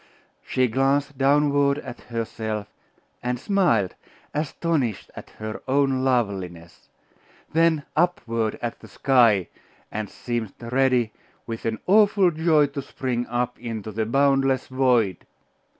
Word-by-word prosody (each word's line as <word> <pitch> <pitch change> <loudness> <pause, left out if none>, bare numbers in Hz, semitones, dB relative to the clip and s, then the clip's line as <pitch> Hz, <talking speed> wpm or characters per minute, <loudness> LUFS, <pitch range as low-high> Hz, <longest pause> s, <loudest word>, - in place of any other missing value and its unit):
She 130 0 +1
glanced 135 +4 +1
downward 140 0 +3
at 135 - -8
herself; 110 -2 -4 0.6
and 125 0 -2
smiled, 130 - +2 0.4
astonished 150 - -1
at - - -10
her 110 0 -6
own 135 -1 +2
loveliness; 95 -10 -2 0.6
then 165 -2 +3
upward 115 -11 0
at 120 -1 -3
the - - -13
sky; 115 -9 +3 0.4
and 110 -1 -4
seemed 120 -4 -4
ready, 125 -1 +1 0.3
with 115 -1 -6
an 110 -1 -1
awful 200 -2 +5
joy, 160 -2 +3
to 140 0 -5
spring 125 -2 -3
up 120 0 -2
into 110 -3 -5
the 110 +1 -2
boundless 135 +1 +2
void. 125 -8 +1
125 Hz, 120 wpm, -24 LUFS, 115-140 Hz, 0.6 s, awful